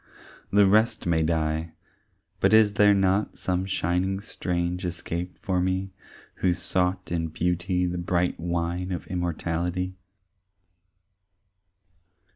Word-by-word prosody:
The 100 0 +5
rest 110 +4 +3
may 85 -2 +2
die 80 0 0 0.7
but - - +3
is 110 -2 +6
there 105 -1 +5
not 95 +1 +1
Some 95 +1 -1
shining 95 +1 0
strange 90 -2 -2
escape 85 0 -4
for 90 -1 0
me 95 +1 -1 0.5
Who 90 -2 +2
sought 90 +1 -1
in 85 -1 0
Beauty 90 +3 0
the 90 0 -2
bright 90 0 0
wine 85 +2 -2
Of 90 - -4
immortality? 90 +1 -2
90 Hz, 110 wpm, -26 LUFS, 85-95 Hz, 0.7 s, is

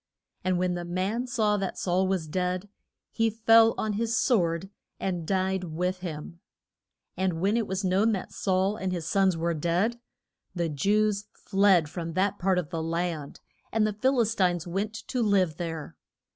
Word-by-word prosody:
And 185 0 +1
when 180 0 +1
the 175 0 -3
man 190 +8 -2
saw 215 -4 +1
that 195 -2 -3
Saul 185 +1 +1
was 185 -4 -1
dead, 180 +3 -2 0.4
he 225 0 +2
fell 225 +1 +5
on 215 -1 -1
his 230 +2 0
sword 185 - +1 0.3
and 175 -4 -2
died 190 -1 0
with 180 +3 -2
him. 170 -1 -7 0.8
And 185 -3 -1
when 200 +5 +2
it 230 -2 0
was 190 +1 -2
known 195 +4 +3
that 190 - -4
Saul 190 +2 +1
and 190 -1 -2
his 170 -3 -3
sons 190 0 +2
were 170 +1 0
dead, 175 +9 0 0.6
the 170 -2 0
Jews 205 +7 +1
fled 195 -5 +3
from 165 +1 -5
that 195 +3 0
part 190 0 +2
of 170 -5 -2
the 165 - -2
land, 165 -3 -3 0.3
and 220 -1 +2
the 215 - 0
Phil 260 +5 +1
is 225 -1 +1
tines 180 -4 +1
went 200 +5 -3
to 250 - 0
live 190 -7 +2
there. 165 -3 -5
185 Hz, 175 wpm, -27 LUFS, 175-210 Hz, 0.8 s, fell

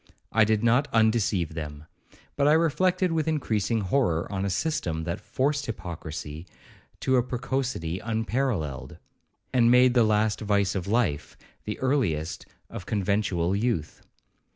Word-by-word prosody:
I 110 -1 +4
did 110 0 +1
not 125 +5 +3
undeceive 110 -7 +2
them; 75 -2 -6 0.5
but 140 0 +2
I 150 - +6
reflected 180 +3 +2
with 160 -2 0
increasing 115 -8 0
horror 95 -5 +1
on 95 -1 -2
a - - 0
system 90 - -1
that 85 +1 -3
forced 140 +1 -1
hypocracy 80 -5 -6 0.5
to 130 0 +2
a 125 - +3
precocity 125 -8 -3
unparalleled, 110 - -2 0.6
and 120 -2 +4
made 125 0 +6
the 120 -2 +5
last 110 0 +1
vice 100 -2 +1
of 95 -1 -3
life 105 -10 0 0.3
the 105 - -4
earliest 105 - -1 0.2
of - - -9
conventual 100 -3 0
youth. 100 -8 -2
110 Hz, 135 wpm, -26 LUFS, 90-130 Hz, 0.6 s, I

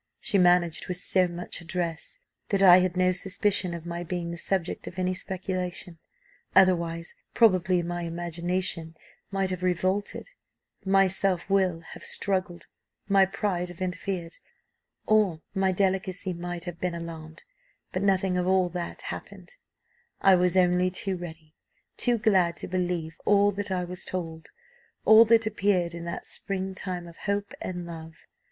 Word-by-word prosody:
She 205 -5 +1
managed 175 -2 +3
with 180 - -3
so 185 0 +2
much 175 +1 -6
address, 170 - -4 0.3
that 195 -1 +3
I 180 -1 +9
had 180 -1 0
no 185 0 +4
suspicion 190 -1 +1
of 170 -1 -8
my 170 0 -4
being 175 0 -3
the 170 - -6
subject 185 -2 -2
of 175 - -8
any 185 0 0
speculation 185 -2 -4 0.6
otherwise, 170 -3 +3 0.2
probably, 185 -5 +4
my 175 +1 -3
imagination 170 0 -3 0.3
might 195 -1 -1
have 185 -1 -4
revolted, 185 - -1 0.5
my 195 0 +4
self 190 -1 -1
will 185 -4 +2
have - - -11
struggled, 185 -3 -2 0.4
my 195 -1 +5
pride 190 -2 -2
have 175 - -11
interfered, 180 -2 -3 0.7
or 205 -7 +2
my 190 -1 +2
delicacy 190 0 0
might 175 0 -5
have 175 -1 -7
been 180 -1 -2
alarmed, 165 -2 -8 0.5
but - - -2
nothing 190 -2 +2
of 180 0 0
all 185 -1 +3
that 175 0 -5
happened; - - -8 0.7
I 195 - +6
was 180 0 +3
only 180 0 +4
too 190 +1 -2
ready, 160 -3 -9 0.4
too 240 -1 +2
glad 190 -6 +2
to - - -5
believe 175 -3 -2
all 205 0 +4
that 205 0 -4
I 185 -1 -1
was 180 +1 -5
told, 165 -3 -5 0.6
all 220 +1 +9
that 225 0 +4
appeared 200 -5 +1
in 170 0 -7
that 170 - -5
spring 190 -1 -4
time 180 -2 -5
of 170 - -13
hope 200 0 -2
and 180 -1 -4
love. 160 -1 -9
180 Hz, 155 wpm, -27 LUFS, 170-190 Hz, 0.7 s, I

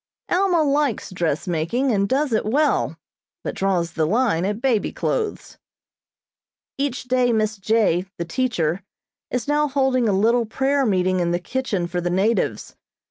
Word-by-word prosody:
Alma 355 -3 +3
likes 285 -7 0
dressmaking, 175 - -1
and 200 -2 +1
does 275 -1 +1
it 220 - +2
well, 285 +8 +1 0.5
but - - -3
draws 180 -4 0
the 160 -1 0
line 210 -4 +1
at 205 +2 -2
baby 240 -4 +1
clothes. 440 -3 -3 1.2
Each 275 -3 -2
day 250 0 +2
Miss 220 -1 0
J., 195 -3 +1
the 170 - -3
teacher, 180 -5 -1 0.5
is 250 0 -3
now 295 +1 +2
holding 265 -4 +1
a - - +3
little 225 +4 +2
prayer 270 +3 +1
meeting 185 -2 +1
in 175 -1 +1
the 175 0 0
kitchen 210 -3 -2
for 175 +1 -3
the 175 - -1
natives. 195 +6 0
220 Hz, 150 wpm, -22 LUFS, 185-265 Hz, 1.2 s, Alma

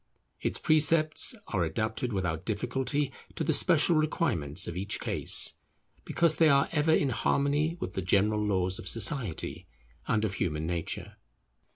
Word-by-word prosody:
Its - - -2
precepts 155 +5 +4
are 90 - 0
adapted 110 +7 -3
without 90 -5 -3
difficulty 130 +6 -2 0.2
to - - -2
the 160 - +1
special 165 +1 +3
requirements 130 - 0
of 85 - -5
each 95 +3 -3
case, - - +1 0.5
because 170 -2 +1
they 160 -1 +5
are 140 -1 +3
ever 155 0 +1
in 145 -3 +2
harmony 145 +6 0
with 90 - -5
the 95 - -3
general 105 +4 +1
laws 95 -2 0
of - - -8
society 115 - -1 0.4
and 110 -1 +1
of 100 - -2
human 75 -4 -2
nature. 85 -1 -4
115 Hz, 150 wpm, -28 LUFS, 95-150 Hz, 0.5 s, they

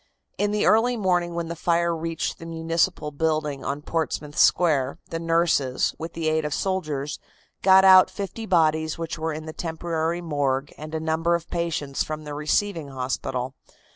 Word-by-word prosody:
In 205 - +2
the 210 0 0
early 240 +3 +4
morning, 175 -4 +1
when 170 -1 -2
the 170 - -4
fire 170 0 +1
reached 165 0 -3
the 165 - -8
municipal 165 -1 -1
building 150 -2 -1
on 145 +1 -3
Portsmouth 150 -2 -3
Square, 140 -7 +3
the 165 - -2
nurses, 165 -6 +1
with 165 +1 -6
the 165 -1 -2
aid 155 0 +1
of 150 -1 -2
soldiers, 155 -7 -2 0.4
got 190 0 +6
out 185 -1 +8
fifty 215 +3 -6
bodies 160 -3 +2
which 165 -1 -5
were 160 +1 -1
in 155 0 -6
the 155 - -7
temporary 165 0 -2
morgue 145 -4 -1
and 155 +1 -7
a - - -1
number 160 +2 +1
of 170 -1 -6
patients 165 -5 -1
from 155 0 -5
the 150 -1 -6
receiving 155 +2 0
hospital. 130 -1 -3
160 Hz, 170 wpm, -24 LUFS, 150-170 Hz, 0.4 s, out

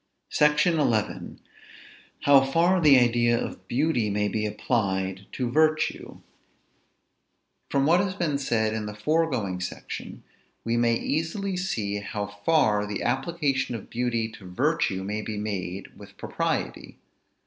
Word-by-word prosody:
SECTION 150 +3 +3
XI. 115 -8 -1 0.8
HOW 140 -1 +6
FAR 170 +7 +2
THE 145 -4 +7
IDEA 120 -1 +3
OF - - -6
BEAUTY 125 -4 +1
MAY 105 0 0
BE 105 +1 -1
APPLIED 95 -4 -1
TO 125 -2 -2
VIRTUE. 155 +2 +1 1.5
From 140 0 +2
what 170 +4 +5
has 190 -1 -1
been 155 -7 -1
said 110 -5 0
in 110 -1 -3
the 105 - -6
foregoing 120 - 0
section, 90 0 -7 0.4
we 115 0 0
may 120 0 +3
easily 165 - -2
see 105 - -2
how 105 0 -4
far 105 0 +1
the 105 - -4
application 135 -3 0
of 110 - -9
beauty 120 -2 -1
to 100 -4 -12
virtue 130 - 0
may 105 +2 -3
be 105 -1 -5
made 100 -3 -4
with - - -14
propriety. - - -3
120 Hz, 135 wpm, -26 LUFS, 105-150 Hz, 1.5 s, THE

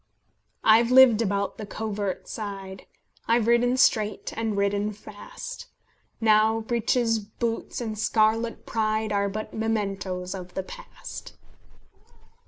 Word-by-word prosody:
"I've 225 +2 +5
lived 255 -3 +7
about 200 -2 -1
the 215 - -5
covert 205 -3 -4
side, 195 -3 -7 0.4
I've 230 -1 +3
ridden 240 +2 +3
straight, 215 -5 +2
and 220 -2 -2
ridden 200 +1 0
fast; 215 - -9 0.5
Now 220 0 +4
breeches, 230 0 +1
boots, 225 +2 -4
and 225 -3 -3
scarlet 220 +1 +1
pride 215 -1 -1
Are 200 -1 +1
but 215 +2 -6
mementoes 195 -4 -2
of 180 -2 -8
the 190 - -2
past." - - -10
215 Hz, 115 wpm, -26 LUFS, 200-230 Hz, 0.5 s, lived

